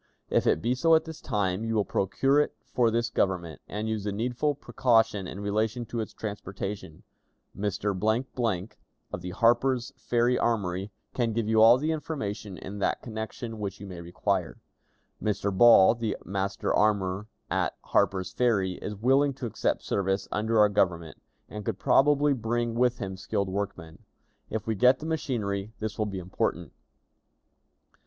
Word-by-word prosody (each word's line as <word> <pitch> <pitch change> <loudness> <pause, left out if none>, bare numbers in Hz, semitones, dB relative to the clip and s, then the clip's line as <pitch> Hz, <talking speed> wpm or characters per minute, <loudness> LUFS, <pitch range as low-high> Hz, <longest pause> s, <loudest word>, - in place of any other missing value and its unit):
If - - +2
it 80 - +2
be 120 +2 +2
so 165 +6 +4
at 160 - +2
this 160 -1 -9
time, 100 -4 -1
you 115 0 -1
will 105 -2 +2
procure 135 +9 +2
it 150 - 0
for 120 -2 +2
this 115 +1 0
Government, 85 -7 -1
and 105 +2 -4
use 110 -2 -2
the 105 - -2
needful 125 +7 -1
precaution 115 -7 +1
in 95 - -7
relation 110 +4 -1
to 115 +1 -4
its 110 -2 -4
transportation. 100 -4 -6 0.5
Mr., 105 +1 -1 0.4
of 90 - -4
the 90 - -5
Harper's 120 +5 +2
Ferry 120 +1 +1
Armory, 100 -4 0 0.2
can 115 -3 0
give 115 -1 -1
you 110 0 +4
all 115 +2 +8
the 155 +4 -1
information 105 - -4
in 100 +1 -7
that - - 0
connection 110 0 -6
which 100 -1 -4
you 100 - -8
may 90 -3 -8
require. 90 +1 -2 0.6
Mr. 100 -2 -1
Ball, 115 -2 +8
the 115 -2 -3
master 100 +1 -2
armorer 100 -1 +1 0.2
at - - 0
Harper's 95 -1 +1
Ferry, 100 -7 +1
is 105 - -4
willing 135 +6 +2
to 125 - -6
accept 115 - -1
service 95 0 -1
under 110 +2 0
our 105 -1 +6
Government, 85 -5 0 0.3
and 105 0 -7
could 110 -3 -2
probably 145 +6 +4
bring 120 -1 -1
with 125 +1 +2
him 95 -3 -5
skilled 100 +1 -2
workmen. 95 -4 -5 0.5
If 110 -1 -3
we 110 - 0
get 125 +5 +5
the 155 - -8
machinery, 110 -10 -2
this 110 0 -5
will 110 - +1
be 100 -2 -5
important. 90 0 -2
110 Hz, 160 wpm, -28 LUFS, 95-120 Hz, 0.6 s, all